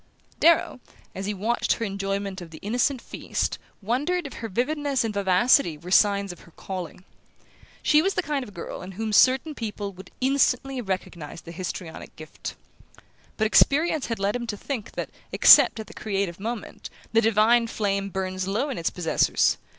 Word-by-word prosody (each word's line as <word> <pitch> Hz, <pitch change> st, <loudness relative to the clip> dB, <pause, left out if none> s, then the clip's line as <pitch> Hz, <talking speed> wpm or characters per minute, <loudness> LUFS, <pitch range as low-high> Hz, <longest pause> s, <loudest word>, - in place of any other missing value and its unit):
Darrow, 330 Hz, -5 st, +4 dB, 0.3 s
as 195 Hz, +1 st, -5 dB
he 210 Hz, -, -1 dB
watched 225 Hz, +5 st, 0 dB
her 230 Hz, -, -3 dB
enjoyment 195 Hz, -1 st, -3 dB
of 170 Hz, -, -9 dB
their 160 Hz, -, -11 dB
innocent 245 Hz, +5 st, 0 dB
feast, -, -, -3 dB, 0.2 s
wondered 290 Hz, -, 0 dB
if 280 Hz, -, -7 dB
her 225 Hz, -, -4 dB
vividness 280 Hz, +5 st, 0 dB
and 225 Hz, -2 st, -2 dB
vivacity 195 Hz, -, +3 dB
were 175 Hz, +4 st, -10 dB
signs 200 Hz, -1 st, +3 dB
of 175 Hz, -, -12 dB
her 170 Hz, -, -17 dB
calling. 185 Hz, -1 st, -7 dB, 0.8 s
She 300 Hz, -, +5 dB
was 390 Hz, +4 st, 0 dB
the 360 Hz, -, 0 dB
kind 285 Hz, -3 st, -2 dB
of 205 Hz, -5 st, -12 dB
girl 170 Hz, -, -6 dB
in 185 Hz, +1 st, -8 dB
whom 215 Hz, +2 st, -3 dB
certain 260 Hz, +7 st, +4 dB
people 210 Hz, -5 st, -5 dB
would 190 Hz, +1 st, -12 dB
instantly 270 Hz, 0 st, +1 dB
have 235 Hz, -6 st, -6 dB
recognized 170 Hz, -4 st, -5 dB
the 170 Hz, -, -8 dB
histrionic 175 Hz, -1 st, -7 dB
gift. 155 Hz, 0 st, -8 dB, 0.8 s
But 220 Hz, -, +1 dB
experience 295 Hz, +6 st, +3 dB
had 230 Hz, -, -2 dB
led 200 Hz, +2 st, 0 dB
him 240 Hz, -1 st, -3 dB
to 210 Hz, -2 st, -4 dB
think 235 Hz, -2 st, -5 dB
that, -, -, -5 dB, 0.2 s
except -, -, +7 dB
at 220 Hz, -, -5 dB
the -, -, -13 dB
creative 195 Hz, -4 st, -3 dB
moment, 225 Hz, +2 st, -6 dB, 0.2 s
the 225 Hz, -, +5 dB
divine 225 Hz, +2 st, +4 dB
flame 200 Hz, -3 st, -1 dB
burns 185 Hz, -1 st, -3 dB
low 230 Hz, +9 st, -1 dB
in 250 Hz, -, -4 dB
its 165 Hz, -, 0 dB
possessors. 175 Hz, -3 st, +1 dB
210 Hz, 180 wpm, -25 LUFS, 190-250 Hz, 0.8 s, except